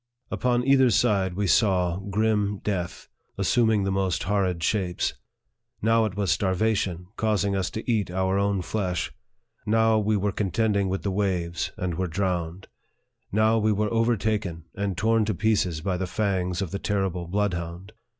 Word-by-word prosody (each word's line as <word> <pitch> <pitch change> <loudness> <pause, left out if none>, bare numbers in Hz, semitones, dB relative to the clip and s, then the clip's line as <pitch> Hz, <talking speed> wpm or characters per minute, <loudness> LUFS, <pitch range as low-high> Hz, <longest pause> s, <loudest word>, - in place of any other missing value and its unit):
Upon 125 -1 +1
either 135 -2 +5
side 100 -5 +2
we 100 +2 0
saw 90 -3 +2
grim 105 0 0
death, 90 -4 -3 0.3
assuming 110 -4 +2
the 95 - 0
most 95 -2 0
horrid 95 -3 0
shapes. 90 -2 0 0.7
Now 115 +1 +3
it 100 -2 -4
was 100 -5 +1
starvation, 95 +1 0
causing 105 -2 +1
us 95 -2 -1
to 110 - -6
eat 110 -6 +1
our 95 +2 0
own 100 -2 0
flesh; 90 -3 -2 0.5
now 110 0 +3
we 105 0 +1
were 100 +1 0
contending 100 0 0
with 95 +1 -2
the 100 - -1
waves, 90 -4 -1
and 90 -2 -3
were 95 - 0
drowned; 90 0 -2 0.6
now 110 +2 +3
we 110 0 +2
were 105 +2 0
over 115 0 +2
taken, 100 -6 -2
and 100 -2 -3
torn 115 +2 +2
to 105 -2 -1
pieces 95 -5 +1
by 95 +1 -1
the 95 0 -2
fangs 95 -2 -1
of 90 - -6
the 100 - -3
terrible 95 -4 -1
bloodhound. 90 0 -3
100 Hz, 160 wpm, -25 LUFS, 90-110 Hz, 0.7 s, either